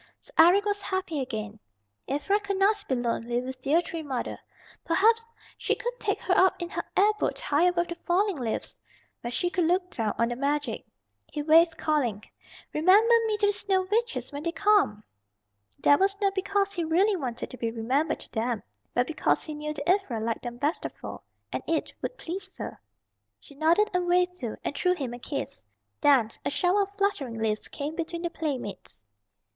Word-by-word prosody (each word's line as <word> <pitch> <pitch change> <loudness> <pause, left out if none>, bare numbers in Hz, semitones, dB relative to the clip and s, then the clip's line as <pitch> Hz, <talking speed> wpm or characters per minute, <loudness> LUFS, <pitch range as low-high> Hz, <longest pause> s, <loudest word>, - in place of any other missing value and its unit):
So - - -13
Eric 360 +5 +7
was 410 -1 0
happy 375 -6 -2
again, 220 -4 -5 0.5
Ivra 295 +10 +1
could 400 -1 -3
not 405 +2 +3
be 260 - +1
lonely 240 0 -1
with 255 +1 -6
dear 310 +6 +3
Tree 330 -1 -5
Mother. 270 -5 -4 0.4
Perhaps 450 +7 +3 0.3
she - - +1
would - - -3
take - - 0
her 370 - +1
up 375 0 +4
in 345 -1 -4
her - - -3
air 410 +2 +6
boat - - -1
high 295 +4 +2
above 350 -1 +2
the - - -2
falling 380 +1 +2
leaves, 235 -4 -3 0.5
where 240 - -4
she 350 +9 -1
could 355 -2 +1
look 360 +2 +1
down 220 -3 -1
on 230 0 +2
the 240 - -2
magic. 285 +3 -1 0.4
He 295 - -3
waved, 325 +2 +5
calling, 245 -10 0 0.5
"Remember 395 +9 +5
me 430 -1 0
to 415 - +2
the 410 - +4
Snow 385 -2 0
Witches 465 -3 0
when 285 0 -5
they 335 +2 -1
come." 345 - +3 0.7
That 285 - +5
was 395 +1 +2
not 395 -1 +2
because 395 +1 0
he 350 -3 -1
really 370 +6 +3
wanted 255 -9 -4
to 255 - -8
be 230 - -1
remembered 255 +8 0
to - - -12
them 225 -2 -1 0.3
but 245 - +3
because 315 - 0
he 310 - -6
knew 300 0 -4
that 295 -1 -5
Ivra 360 - +2
liked 225 +1 -2
them 240 -1 -6
best 295 +6 -1
of - - -4
all, - - -7 0.3
and - - -2
it 325 -1 -1
would - - -4
please 380 +3 -6
her. - - -7 0.6
She - - -16
nodded 330 +9 +3
and 360 -1 0
waved 360 0 +3
too, 235 -8 -4
and - - -2
threw 360 +3 +2
him 265 -7 -4
a 240 - -7
kiss. - - -4 0.4
Then 275 -7 +5
a - - 0
shower 360 +6 +2
of 400 0 -3
fluttering 300 - 0
leaves 220 -1 -1
came 295 +2 -5
between 335 0 -4
the 345 - -2
playmates. 240 - -5
325 Hz, 195 wpm, -27 LUFS, 255-385 Hz, 0.7 s, Eric